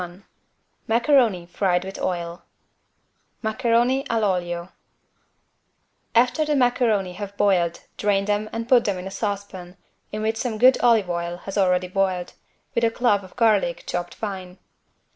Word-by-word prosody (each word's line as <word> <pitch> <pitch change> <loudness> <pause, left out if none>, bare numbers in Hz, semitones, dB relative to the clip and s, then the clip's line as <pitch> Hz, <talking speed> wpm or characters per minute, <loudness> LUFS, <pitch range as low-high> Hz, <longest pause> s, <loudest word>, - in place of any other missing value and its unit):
21 180 +2 -9 0.6
MACARONI 235 - +3
FRIED 180 0 0
WITH 195 - -7
OIL 170 -1 -3 1.0
(Maccheroni 240 +3 +1
all'olio) 180 -5 -1 1.5
After 250 +6 +3
the 300 -1 0
macaroni 240 -7 +2
have 200 +1 -7
boiled 180 -5 +2 0.2
drain 200 -1 +1
them 210 +1 -1
and 230 0 -4
put 245 -2 +5
them 200 -3 0
in 180 - -7
a 190 - -6
saucepan 195 -3 -5 0.3
in 215 +1 -4
which 220 +1 0
some 225 -2 -2
good 255 +3 +5
olive 230 -5 +4
oil 170 0 -3
has 195 - -5
already 180 -2 +2
boiled, 185 -1 -1 0.4
with 235 - 0
a 230 - +4
clove 225 -4 +1
of 185 - -14
garlic 215 -7 +2
chopped 175 0 -4
fine. 190 -3 -6
200 Hz, 140 wpm, -23 LUFS, 180-230 Hz, 1.5 s, put